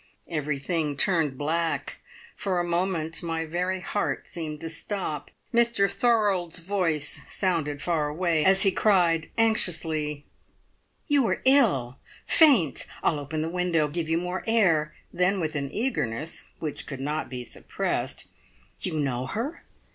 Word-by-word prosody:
Everything 150 0 -1
turned 155 -5 +2
black; 160 +3 -1 0.4
for 185 -3 -1
a - - +1
moment 170 -2 -1
my 165 -1 -2
very 180 +3 -2
heart 205 +2 -2
seemed 155 -3 -6
to 165 - -3
stop. 165 -1 -4 0.2
Mr 235 -4 +4
Thorold's 205 -8 +1
voice 170 -5 -1
sounded 155 -7 -1
far 160 -4 +1
away, 160 0 +1
as 190 +2 +5
he 195 - +5
cried 175 -6 +3
anxiously: 160 -9 +1 0.8
"You 285 -5 +3
are - - -1
ill 190 - +3 0.3
faint! 245 - +5 0.2
I'll 150 - +2
open 155 +2 -3
the - - -2
window 175 -3 +1
give 160 +2 -3
you 165 - +2
more 180 +2 -3
air." 165 -10 +3 0.2
Then 180 +2 +2
with 160 -2 -2
an 140 -2 -2
eagerness 165 - -2
which 155 -3 -5
could 135 -3 -6
not 150 +3 -2
be 125 -1 -5
suppressed, - - -3 0.5
"You - - -3
know 130 -3 -1
her? 255 - -4
165 Hz, 140 wpm, -26 LUFS, 150-190 Hz, 0.8 s, as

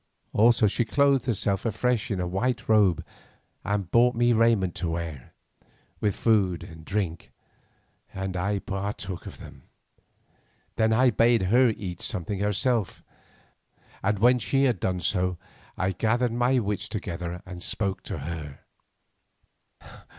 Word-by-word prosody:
Also 115 +1 +5
she 105 +4 +2
clothed 135 +1 +2
herself 100 -4 0
afresh 115 +1 0
in 100 -4 -2
a 90 - -1
white 115 +7 -1
robe 105 -6 +3 0.6
and 100 -3 -2
brought 120 +1 +4
me 120 +1 +3
raiment 110 -6 +3
to 85 0 -3
wear, 80 -6 -5 0.7
with 105 -3 0
food 100 -6 +1
and 80 -1 -11
drink, 95 -2 -3 0.8
and 95 -1 -4
I 100 +3 0
partook 95 -2 -5
of - - -9
them. - - -12 1.1
Then 110 0 +2
I 125 +3 +4
bade 115 0 +3
her 125 0 +6
eat 95 -5 -5
something 95 +3 -2
herself, 105 +2 0 1.0
and 105 +2 +1
when 125 +4 +4
she 135 +4 +1
had 125 -8 +2
done 90 0 -1
so 90 -2 0 0.4
I 95 +1 0
gathered 115 +5 0
my 125 +2 +2
wits 105 -1 -2
together 90 -4 -5
and 90 -1 -9
spoke 95 0 -2
to - - -4
her. 75 -1 -7
105 Hz, 135 wpm, -26 LUFS, 90-115 Hz, 1.1 s, her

